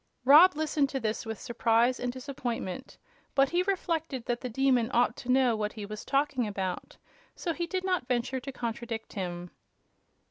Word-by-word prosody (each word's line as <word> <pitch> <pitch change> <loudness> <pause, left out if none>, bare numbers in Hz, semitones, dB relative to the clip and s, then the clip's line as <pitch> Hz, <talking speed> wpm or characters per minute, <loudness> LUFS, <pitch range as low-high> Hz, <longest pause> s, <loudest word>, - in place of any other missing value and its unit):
Rob 310 +7 +8
listened 300 -2 +1
to 270 - -2
this 220 0 -2
with 225 -1 -4
surprise 235 +1 +2
and 245 - -2
disappointment; 255 -3 -5 0.4
but 275 0 +4
he 350 +1 +2
reflected 330 -9 -2
that 240 0 -2
the 250 - -4
Demon 250 -1 +2
ought 240 +1 +3
to 245 - -9
know 255 -3 +4
what 210 -1 -2
he 210 -2 -6
was 215 +1 -7
talking 275 -4 +1
about, 190 -3 -4 0.4
so 340 - -2
he 340 +1 -3
did 370 +1 -2
not 365 -9 0
venture 255 +1 -1
to 275 +2 -7
contradict 235 -2 -5
him. 175 -2 -5
250 Hz, 175 wpm, -29 LUFS, 225-280 Hz, 0.4 s, Rob